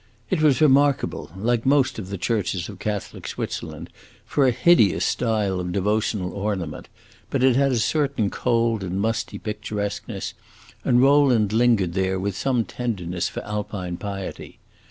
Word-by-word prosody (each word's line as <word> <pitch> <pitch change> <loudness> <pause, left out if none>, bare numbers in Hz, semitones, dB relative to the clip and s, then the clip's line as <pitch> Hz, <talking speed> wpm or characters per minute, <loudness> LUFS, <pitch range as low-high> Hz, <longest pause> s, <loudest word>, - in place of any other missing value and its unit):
It - - +1
was 150 -2 +4
remarkable, 145 -2 +3
like 115 +3 0
most 130 -3 +2
of 95 -3 -7
the 100 - -4
churches 95 -4 -1
of 100 -3 -10
Catholic 105 -1 -4
Switzerland, - - -5 0.3
for 140 -2 +2
a - - +4
hideous 125 - +4
style 105 -5 0
of 90 0 -3
devotional 100 -1 0
ornament; 100 -6 -4 0.4
but 135 -2 0
it 130 -2 +5
had 135 +1 +3
a 125 - +1
certain 135 -3 0
cold 115 -3 +1
and 95 +1 -3
musty 115 +2 -1
picturesqueness, 105 -1 -4 0.5
and 120 +1 +4
Rowland 135 -7 +4
lingered 110 -7 +3
there 95 0 0
with 100 0 -2
some 125 +1 0
tenderness 90 -8 -3
for - - -6
Alpine 100 -4 -4
piety. 100 -1 -6
110 Hz, 150 wpm, -23 LUFS, 95-125 Hz, 0.5 s, it